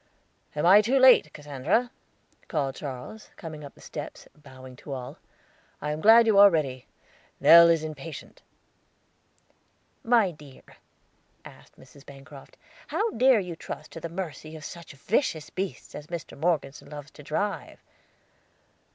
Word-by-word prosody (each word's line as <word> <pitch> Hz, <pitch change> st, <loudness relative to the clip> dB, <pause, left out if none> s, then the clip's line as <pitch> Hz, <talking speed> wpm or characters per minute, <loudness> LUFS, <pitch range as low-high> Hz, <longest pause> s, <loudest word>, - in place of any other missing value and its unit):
"I -, -, -4 dB
am -, -, 0 dB
not 200 Hz, +4 st, +7 dB
too 260 Hz, +4 st, +2 dB
late, 255 Hz, -, +6 dB
Cassandra?" 150 Hz, -, -1 dB, 0.6 s
called 140 Hz, -5 st, -2 dB
Charles, 140 Hz, -, -8 dB
coming 155 Hz, -3 st, -9 dB
up 140 Hz, -, -11 dB
the -, -, -19 dB
steps, -, -, -9 dB
bowing 130 Hz, -3 st, -14 dB
to 140 Hz, -, -8 dB
all. 125 Hz, -2 st, -8 dB, 0.6 s
"I 150 Hz, -, -3 dB
am 150 Hz, +1 st, -4 dB
glad 225 Hz, +4 st, +7 dB
you 215 Hz, -3 st, +4 dB
are 200 Hz, 0 st, +9 dB
ready; 135 Hz, -7 st, -2 dB, 0.5 s
Nell 170 Hz, 0 st, +8 dB
is 165 Hz, -2 st, +2 dB
impatient." 155 Hz, 0 st, -9 dB, 1.6 s
"My 230 Hz, -5 st, +3 dB
dear," 150 Hz, -4 st, -16 dB, 0.8 s
asked -, -, -16 dB
Mrs. 140 Hz, -, -17 dB
Bancroft, 140 Hz, 0 st, -14 dB, 0.3 s
"how 445 Hz, +2 st, -1 dB
dare 255 Hz, -2 st, +4 dB
you 180 Hz, -3 st, -7 dB
trust -, -, -9 dB
to -, -, -8 dB
the 170 Hz, -, -6 dB
mercy 160 Hz, -3 st, -7 dB
of 155 Hz, -, -10 dB
such 170 Hz, -4 st, -10 dB
vicious 155 Hz, -, -2 dB
beasts 190 Hz, 0 st, -6 dB
as 150 Hz, 0 st, -9 dB
Mr. 170 Hz, -1 st, -7 dB
Morgeson 145 Hz, -3 st, -2 dB
loves 145 Hz, -1 st, -10 dB
to -, -, -14 dB
drive?" 200 Hz, +8 st, -4 dB
155 Hz, 145 wpm, -26 LUFS, 145-195 Hz, 1.6 s, are